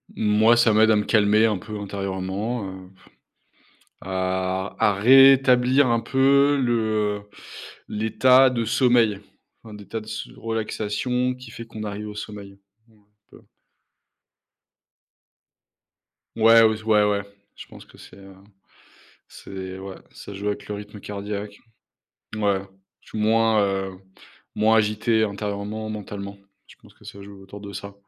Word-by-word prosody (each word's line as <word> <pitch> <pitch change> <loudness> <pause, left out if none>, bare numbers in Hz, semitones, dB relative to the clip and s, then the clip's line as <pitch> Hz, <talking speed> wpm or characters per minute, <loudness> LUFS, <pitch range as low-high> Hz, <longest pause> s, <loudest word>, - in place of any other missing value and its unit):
Moi, 110 +2 +3
ça 115 -2 +4
m'aide 110 +1 +4
à - - +4
me 105 - +1
calmer 105 0 +3
un 105 -3 +1
peu 105 +3 -8
intérieurement, 100 +3 -4
heu, 95 -1 -11 1.1
à 95 +1 -3
à 105 - +3
réétablir 130 +3 +5
un 115 -1 +2
peu 140 +4 +3
le, 120 -1 +1 0.5
heu, - - -14 0.7
l'état 115 +5 +4
de 120 -2 -1
sommeil, 115 -3 +2 0.4
enfin, 110 -2 -12
d'état 105 +2 -7
de - - -13
s 110 0 -6
de - - -17
relaxation 115 +3 -2
qui 125 +1 -13
fait 115 - -9
qu'on 110 -2 -9
arrive 105 0 -6
au 105 - -10
sommeil, 100 -2 -9 0.3
un 105 -2 -27 0.3
peu. - - -17 2.9
Ouais, 115 0 +6
aus 110 -1 +2
ouais, 110 -1 +3
ouais, 105 -1 +1 0.3
je - - -11
pense - - -14
que - - -20
c'est, - - -15
heu, 95 -1 -15 0.9
c'est 95 -1 -9
ouais, 95 0 -8 0.2
ça 100 - -11
joue 100 +1 -4
avec 105 - -5
le 105 - -4
rythme 105 0 -10
cardiaque. 100 +1 -6 0.8
Ouais, 100 -3 0 0.4
je - - -19
suis - - -6
moins, 110 0 +2
heu, 95 -1 -3 0.6
moins 110 +1 +3
agité 110 +1 +1
intérieurement, 105 +1 -4
mentalement, 100 -1 -7 0.3
je - - -17
pense - - -18
que - - -22
ça 100 - -11
joue 100 0 -13
autour 100 +1 -12
de 100 0 -9
ça 100 0 -8
105 Hz, 145 wpm, -23 LUFS, 100-115 Hz, 2.9 s, Ouais